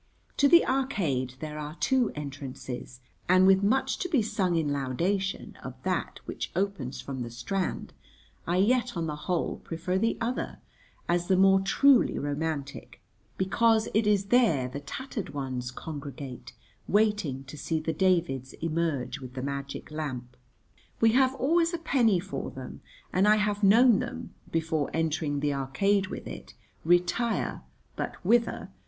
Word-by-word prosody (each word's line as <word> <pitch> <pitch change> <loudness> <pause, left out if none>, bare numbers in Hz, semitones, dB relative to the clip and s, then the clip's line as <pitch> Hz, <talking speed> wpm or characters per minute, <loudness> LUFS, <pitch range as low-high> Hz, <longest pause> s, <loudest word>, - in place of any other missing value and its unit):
To 285 - +5
the 340 +3 +7
Arcade 170 - 0
there 150 -1 -5
are 150 +1 -6
two 255 +3 +2
entrances, 135 -3 -7 0.3
and 185 +1 +6
with 190 0 +6
much 265 +6 +1
to 360 - -2
be 280 -10 +3
sung 200 -5 0
in 160 -3 +1
laudation 170 +9 -1
of - - -7
that - - -2
which - - -5
opens 180 -11 -2
from 130 +1 -6
the 120 - -4
Strand 125 +12 -3 0.5
I 175 +1 +1
yet 240 +2 +2
on 165 - -1
the 150 -2 -3
whole 170 +3 -2
prefer 180 +3 -3
the 225 +2 +1
other 235 +2 -2 0.5
as 175 0 +1
the 190 - +3
more 195 0 +5
truly 255 +7 +4
romantic, 145 -1 -4 0.4
because 220 +4 +2
it 220 0 +2
is 200 -1 +2
there 185 - +4
the 135 +3 -6
tattered 195 - -6
ones 130 -3 -3
congregate, 140 -2 -8 0.3
waiting 205 -11 +1
to 135 +2 -10
see 160 +2 -2
the 160 +1 -2
Davids 165 -9 +1
emerge 160 -5 -2
with 130 -1 -10
the 130 - -4
magic 140 +1 -5
lamp. 130 -5 -5 0.6
We 225 -1 +5
have 260 +2 +3
always 335 +6 +2
a - - -2
penny 245 - +2
for 190 +2 -5
them, 130 -1 -9 0.3
and 190 +3 +3
I 210 - +7
have 210 -1 0
known 225 +3 +6
them, - - -6 0.2
before 160 -3 0
entering 155 -3 0
the 145 -1 +1
Arcade 190 +9 +1
with - - -7
it, - - -9 0.3
retire 175 +7 +1 0.3
(but - - -3
whither?) 230 +4 +2
175 Hz, 155 wpm, -28 LUFS, 140-210 Hz, 0.6 s, the